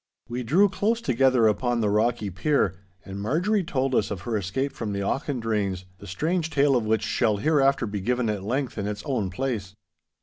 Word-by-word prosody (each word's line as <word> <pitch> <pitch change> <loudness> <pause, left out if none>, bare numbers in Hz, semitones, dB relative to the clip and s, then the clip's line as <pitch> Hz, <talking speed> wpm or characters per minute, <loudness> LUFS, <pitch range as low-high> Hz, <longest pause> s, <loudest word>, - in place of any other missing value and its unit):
We 120 +1 -4
drew 165 - +4
close 205 +4 0
together 130 - +3
upon 120 +3 +1
the 105 -2 +1
rocky 110 -1 +1
pier, 100 - +1 0.3
and 95 0 -6
Marjorie 180 - +1
told 135 -5 -1
us 105 -4 +2
of 100 -4 -4
her 115 +4 -3
escape 105 +8 -1
from 105 -3 -4
the 100 - -2
Auchendraynes, 110 -7 -1 0.2
the 100 - -11
strange 160 - -1
tale 140 -2 +3
of 120 -3 +1
which 110 0 +1
shall 110 -4 +1
hereafter 135 0 +2
be 105 -2 -4
given 125 +3 0
at 105 -2 -1
length 125 +2 -2
in 100 - -2
its 105 0 -4
own 115 -9 -1
place. 105 -3 -3
120 Hz, 195 wpm, -25 LUFS, 105-140 Hz, 0.3 s, drew